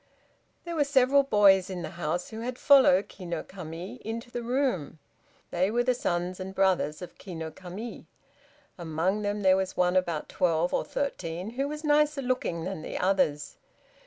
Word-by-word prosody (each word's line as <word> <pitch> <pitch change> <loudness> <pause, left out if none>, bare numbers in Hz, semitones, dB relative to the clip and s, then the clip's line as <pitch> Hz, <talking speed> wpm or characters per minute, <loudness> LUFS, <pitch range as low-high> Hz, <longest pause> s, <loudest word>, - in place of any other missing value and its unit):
There 340 -1 -4
were 300 - +3
several 280 -1 +4
boys 200 -7 +4
in 180 -2 -5
the - - -5
house 175 0 -3
who 220 - -6
had 245 +2 -4
followed 260 -11 +5
Ki 190 - -12
no 170 -2 -3
Kami 175 0 -8
into 230 +2 -5
the 240 - -4
room. 240 - -1 0.5
They 185 +2 +1
were 240 +3 +1
the 250 0 +2
sons 180 -5 -2
and 190 +1 -6
brothers 185 -5 +1
of 180 - -11
Ki 185 -3 -8
no 160 -1 -5
Kami. 190 +7 -8 0.7
Among 170 +5 -1
them 205 0 -2
there 190 0 +5
was 190 -1 -3
one 180 0 +2
about 170 -4 0
twelve 170 0 +1
or - - +1
thirteen, 185 -8 -3
who 270 +4 -2
was 300 +1 -6
nicer 300 -1 +2
looking 245 -10 -1
than 185 -2 -4
the - - -5
others. 170 -7 0
190 Hz, 180 wpm, -28 LUFS, 175-245 Hz, 0.7 s, followed